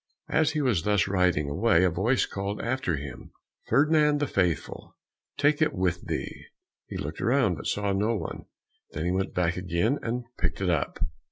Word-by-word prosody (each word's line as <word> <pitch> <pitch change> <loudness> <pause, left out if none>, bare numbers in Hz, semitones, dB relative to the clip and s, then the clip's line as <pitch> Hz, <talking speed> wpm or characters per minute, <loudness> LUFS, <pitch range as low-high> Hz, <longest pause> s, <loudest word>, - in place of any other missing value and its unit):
As 155 -1 +2
he 155 - 0
was 120 - +2
thus 105 +2 +2
riding 90 -6 +2
away, 85 +4 +3
a 90 - +3
voice 110 +10 +2
called 100 +1 -4
after 120 -8 -1
him, 70 -2 -8 0.4
"Ferdinand 150 +3 +4
the 145 - +1
Faithful, 90 - -2 0.4
take 145 +1 +2
it 155 - +3
with 90 -2 0
thee." - - -4 0.4
He - - -6
looked 75 +3 -5
around, 120 -5 +3
but 75 - -6
saw 100 -1 0
no 105 +4 +1
one, 85 -7 -5 0.5
then 80 +2 -3
he 90 - +1
went 95 +1 -1
back 90 -1 +1
again 90 - 0
and 120 +2 -2 0.2
picked 80 -1 -1
it 95 -2 +1
up. 80 -4 -1
95 Hz, 180 wpm, -27 LUFS, 85-125 Hz, 0.5 s, Ferdinand